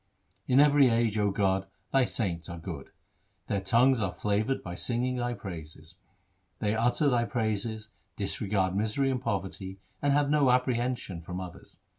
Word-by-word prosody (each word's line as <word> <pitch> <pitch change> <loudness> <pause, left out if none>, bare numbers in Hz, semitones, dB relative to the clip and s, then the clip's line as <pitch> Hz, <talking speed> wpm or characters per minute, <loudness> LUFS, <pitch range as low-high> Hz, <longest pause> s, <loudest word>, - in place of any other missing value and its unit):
In 130 - +4
every 145 -2 +6
age, 115 -2 +1
O 105 -1 +3
God, 95 -1 +1 0.3
Thy 135 -2 +5
saints 85 -9 -2
are 85 - -6
good. 80 -5 -7 0.6
Their 100 -2 -1
tongues 120 +5 +4
are 95 -3 0
flavoured 105 +8 -1
by 90 - -6
singing 125 +6 -1
Thy 120 0 -1
praises. 80 -3 -9 0.6
They 105 0 0
utter 120 +6 +2
Thy 120 -3 +3
praises, 110 -2 -2 0.3
disregard 100 -3 -1
misery 110 +7 +1
and 125 -2 -2
poverty, 95 -3 -3 0.2
and 145 - +2
have 145 0 +2
no 145 -3 +4
apprehension 125 -7 0
from 90 +2 -6
others. 90 -2 -10
110 Hz, 155 wpm, -29 LUFS, 95-125 Hz, 0.6 s, every